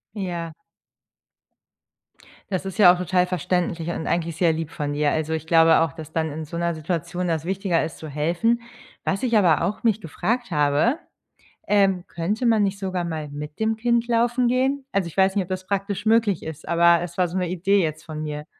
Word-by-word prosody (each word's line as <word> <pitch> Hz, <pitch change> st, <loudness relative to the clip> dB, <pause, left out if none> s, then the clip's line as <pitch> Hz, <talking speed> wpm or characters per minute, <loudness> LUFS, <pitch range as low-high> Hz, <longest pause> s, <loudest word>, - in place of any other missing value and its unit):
Ja. 175 Hz, -5 st, -4 dB, 2.0 s
Das 185 Hz, 0 st, -2 dB
ist 190 Hz, -, -6 dB
ja 180 Hz, -5 st, +8 dB
auch -, -, -3 dB
total 180 Hz, 0 st, +2 dB
verständlich 175 Hz, -1 st, -1 dB
und 165 Hz, -2 st, -3 dB
eigentlich 170 Hz, -1 st, -1 dB
sehr 170 Hz, -1 st, +2 dB
lieb 160 Hz, -1 st, -4 dB
von 145 Hz, -3 st, -4 dB
dir. 145 Hz, 0 st, +1 dB
Also, 155 Hz, 0 st, -1 dB
ich 160 Hz, 0 st, -4 dB
glaube 165 Hz, 0 st, +6 dB
auch, 165 Hz, -3 st, +1 dB
dass 160 Hz, +1 st, -10 dB
dann 160 Hz, -1 st, -1 dB
in 155 Hz, +2 st, -5 dB
so 170 Hz, +3 st, -7 dB
'ner 170 Hz, 0 st, -1 dB
Situation 175 Hz, +3 st, -3 dB
das 160 Hz, -2 st, -1 dB
wichtiger 190 Hz, -2 st, 0 dB
ist 150 Hz, -3 st, -6 dB
zu 160 Hz, -, -8 dB
helfen. 170 Hz, +11 st, 0 dB, 0.4 s
Was 195 Hz, +4 st, -1 dB
ich 240 Hz, -3 st, +1 dB
aber 175 Hz, -6 st, +4 dB
auch 210 Hz, -, -2 dB
mich 220 Hz, -3 st, +2 dB
gefragt 225 Hz, +6 st, -2 dB
habe, 150 Hz, -, +2 dB, 0.7 s
ähm: 195 Hz, -3 st, +2 dB
Könnte 205 Hz, +9 st, -2 dB
man 225 Hz, -2 st, +4 dB
nicht 200 Hz, 0 st, 0 dB
sogar 185 Hz, -2 st, -2 dB
mal 160 Hz, -3 st, -4 dB
mit 150 Hz, +1 st, -8 dB
dem 220 Hz, 0 st, +1 dB
Kind 235 Hz, +1 st, +1 dB
laufen 240 Hz, +1 st, +2 dB
gehen? 265 Hz, +3 st, +1 dB
Also, 195 Hz, -3 st, 0 dB
ich 165 Hz, -, -13 dB
weiß 190 Hz, 0 st, +3 dB
nicht, 200 Hz, -, +1 dB
ob 180 Hz, -, -9 dB
das 185 Hz, 0 st, -4 dB
praktisch 200 Hz, +1 st, -2 dB
möglich 220 Hz, -4 st, +2 dB
ist, 160 Hz, -1 st, -8 dB
aber 170 Hz, 0 st, +5 dB
es 175 Hz, -, -7 dB
war 180 Hz, -, +3 dB
so 175 Hz, +2 st, -6 dB
'ne 180 Hz, -2 st, 0 dB
Idee 190 Hz, +3 st, +2 dB
jetzt 155 Hz, 0 st, -3 dB
von 155 Hz, -2 st, -6 dB
mir. 150 Hz, -1 st, -5 dB
175 Hz, 205 wpm, -23 LUFS, 160-200 Hz, 2.0 s, ja